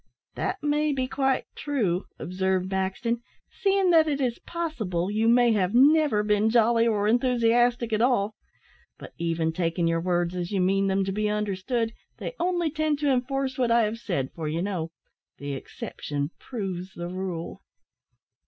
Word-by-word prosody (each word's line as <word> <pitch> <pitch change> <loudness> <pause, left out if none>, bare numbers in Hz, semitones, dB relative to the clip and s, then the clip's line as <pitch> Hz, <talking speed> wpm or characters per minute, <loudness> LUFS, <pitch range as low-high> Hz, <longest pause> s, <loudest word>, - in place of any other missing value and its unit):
"That 380 -2 -3
may 300 +1 +1
be 260 -2 -1
quite 265 0 0
true," 210 - -1
observed 190 +1 -1
Maxton, 195 +5 -1 0.3
"seeing 390 -2 +2
that 320 -2 +5
it 285 -2 0
is 245 -3 -1
possible 220 - -3
you 220 +2 +1
may 240 0 +5
have 200 -1 +1
never 285 -4 +5
been 210 +1 +2
jolly 230 0 +4
or 210 -2 +1
enthusiastic 240 0 +2
at 215 - +2
all; 230 -4 +2 0.6
but - - -11
even 165 -1 0
taking 170 0 0
your 165 0 +1
words 175 0 0
as 175 -1 -3
you 200 - 0
mean 195 +2 +2
them 195 0 +1
to 195 - -2
be 210 +2 0
understood, 210 +3 -1 0.2
they - - -5
only 345 -2 0
tend 310 -1 0
to 290 -1 +1
enforce 265 +1 -1
what 245 -2 +2
I 235 0 +4
have 220 +2 -2
said, 170 - -2
for, 160 -2 -5
you 165 +3 -1
know, 180 -5 -2 0.5
the 140 0 -5
exception 145 +2 -5
proves 190 -6 -5
the 175 0 -5
rule." 180 -2 -5
215 Hz, 165 wpm, -26 LUFS, 185-255 Hz, 0.6 s, that